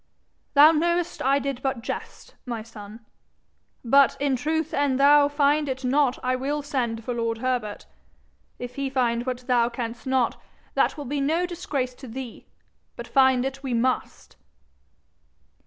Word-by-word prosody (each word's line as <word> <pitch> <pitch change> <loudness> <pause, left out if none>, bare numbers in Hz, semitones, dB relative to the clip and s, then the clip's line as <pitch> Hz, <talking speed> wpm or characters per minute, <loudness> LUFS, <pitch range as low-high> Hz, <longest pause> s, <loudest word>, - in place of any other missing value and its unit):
'Thou 295 +3 +9
know'st 340 +2 0
I 275 +1 +3
did 275 -2 -3
but 265 -4 -2
jest, - - -7
my 230 -3 -4
son. 220 0 -12 0.8
But 275 +3 +5
in 280 -1 +1
truth 315 +4 -2
an'thou 285 +1 +4
find 290 0 +2
it 260 0 -4
not 270 0 +2
I 255 0 +1
will 285 +3 -2
send 240 -6 -2
for 245 - -2
lord 230 -1 -2
Herbert. 240 -4 -2 0.7
If 245 +1 -8
he 275 -1 -1
find 245 -2 0
what 250 -1 -4
thou 240 -2 +2
canst 235 0 -6
not, 260 -2 0 0.3
that - - +1
will 290 - -6
be 280 +2 -2
no 320 +6 +1
disgrace 290 -8 -3
to 260 +1 -12
thee. 245 0 -8 0.5
But - - -8
find 260 -2 +4
it 270 0 -4
we 260 -3 -2
must.' 250 +2 -2
260 Hz, 155 wpm, -25 LUFS, 245-285 Hz, 0.8 s, Thou